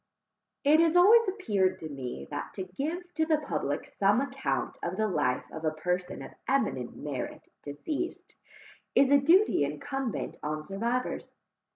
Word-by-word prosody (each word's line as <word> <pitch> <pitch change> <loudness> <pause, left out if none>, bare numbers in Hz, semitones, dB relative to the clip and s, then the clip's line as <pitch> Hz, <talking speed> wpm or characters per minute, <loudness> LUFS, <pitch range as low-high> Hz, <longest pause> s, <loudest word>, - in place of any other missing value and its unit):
It 300 +2 +6
has 330 0 +4
always 435 +6 +7
appeared 210 - +1
to 160 - -7
me, 130 - -6
that - - -5
to 190 - -3
give 320 - -5
to 320 - +1
the 315 -2 +4
public 155 - -2
some 200 +3 +2
account 275 0 -2
of 175 +2 -3
the 215 0 +2
life 125 -9 0
of 160 - -7
a 155 - +3
person 180 +4 -3
of - - -9 0.2
eminent 260 - 0
merit 140 -4 -5
deceased, 285 - -5 0.6
is 275 0 +5
a 285 - +7
duty 340 - +5
incumbent 250 - -3
on 155 0 -3
survivors. 235 +9 -2
210 Hz, 155 wpm, -29 LUFS, -, 0.6 s, always